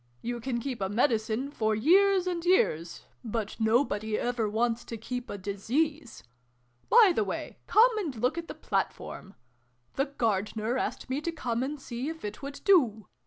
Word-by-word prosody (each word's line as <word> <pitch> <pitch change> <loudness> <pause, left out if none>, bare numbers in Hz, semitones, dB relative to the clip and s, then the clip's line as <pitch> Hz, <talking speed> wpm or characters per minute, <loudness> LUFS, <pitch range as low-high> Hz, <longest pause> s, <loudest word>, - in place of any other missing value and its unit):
You 240 0 -3
can 240 0 -2
keep 250 -3 -5
a 190 - 0
Medicine, 225 +3 0
for 220 -5 0
years 375 - +4
and 350 -2 -2
years: 175 - +1 0.2
but 220 -2 -3
nobody 220 -2 +1
ever 240 -3 -1
wants 230 +2 0
to 230 - -6
keep 245 +3 -5
a - - -4
Disease! 245 +9 -2 0.7
By 455 -5 +7
the 220 - +1
way, 195 - -5
come 460 +2 +5
and 315 -10 -3
look 250 +5 0
at 335 0 -5
the - - -7
platform. 195 +2 -3 0.6
The 275 - +2
Gardener 220 -2 -1
asked 260 - -3
me 265 +3 -2
to 335 - -2
come 240 -7 -2
and 285 +3 -3
see 255 +2 -5
if 320 -7 -7
it 210 0 -6
would 280 0 -7
do. 245 - +4
245 Hz, 170 wpm, -29 LUFS, 220-300 Hz, 0.7 s, By